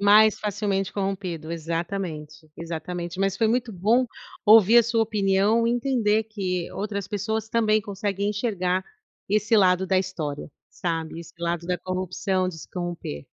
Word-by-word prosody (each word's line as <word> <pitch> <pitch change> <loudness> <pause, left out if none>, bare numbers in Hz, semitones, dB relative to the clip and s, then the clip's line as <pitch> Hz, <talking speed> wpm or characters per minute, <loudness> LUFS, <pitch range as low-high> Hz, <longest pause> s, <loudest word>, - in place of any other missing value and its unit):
Mais 210 +1 +6
facilmente 200 -2 -1
corrompido, 185 -5 -3
exatamente, 165 -2 -4
exatamente, 170 +2 -5
mas 195 0 +1
foi 220 +1 +2
muito 240 -1 0
bom 225 +8 +2 0.4
ouvir 220 +1 +8
a 235 - +7
sua 230 0 +1
opinião 210 +1 +2
e 235 - +2
entender 235 -4 +1
que 185 -5 -3
outras 200 -1 -4
pessoas 220 +2 -2
também 215 -2 +2
conseguem 200 0 -2
enxergar 190 -4 -1 0.4
esse 215 +2 +2
lado 185 -1 +4
da 190 0 +3
história, 155 -7 -4 0.2
sabe, 165 -2 -3
esse 170 - -13
lado 170 0 -2
da 180 0 0
corrupção, 185 0 -1
de 165 -3 -7
se - - -11
corromper. 175 - -5
195 Hz, 150 wpm, -25 LUFS, 175-215 Hz, 0.4 s, ouvir